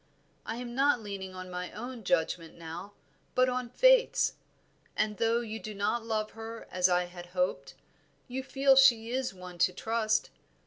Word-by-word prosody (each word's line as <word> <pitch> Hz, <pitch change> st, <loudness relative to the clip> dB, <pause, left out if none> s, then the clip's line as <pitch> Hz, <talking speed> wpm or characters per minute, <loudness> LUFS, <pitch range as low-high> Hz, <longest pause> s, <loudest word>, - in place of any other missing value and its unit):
I 225 Hz, -, -2 dB
am 240 Hz, 0 st, -6 dB
not 275 Hz, 0 st, +3 dB
leaning 195 Hz, -3 st, -6 dB
on 185 Hz, 0 st, -8 dB
my 180 Hz, 0 st, -4 dB
own 240 Hz, +1 st, -7 dB
judgment 165 Hz, -2 st, 0 dB
now, 170 Hz, +4 st, -8 dB, 0.4 s
but 255 Hz, 0 st, +5 dB
on 250 Hz, -1 st, -2 dB
Faith's, -, -, +4 dB, 0.6 s
and 215 Hz, -1 st, 0 dB
though 230 Hz, +1 st, +2 dB
you 220 Hz, -1 st, -5 dB
do 215 Hz, -1 st, -7 dB
not 205 Hz, +4 st, 0 dB
love 215 Hz, -1 st, -2 dB
her 225 Hz, +1 st, -8 dB
as 180 Hz, 0 st, +3 dB
I 180 Hz, 0 st, +2 dB
hoped, 175 Hz, -5 st, -3 dB, 0.5 s
you 260 Hz, +1 st, -3 dB
feel 270 Hz, +1 st, +3 dB
she 240 Hz, -4 st, +5 dB
is 260 Hz, 0 st, -1 dB
one 180 Hz, -2 st, -11 dB
to 175 Hz, -, +4 dB
trust. 220 Hz, +3 st, 0 dB
220 Hz, 165 wpm, -30 LUFS, 180-245 Hz, 0.6 s, but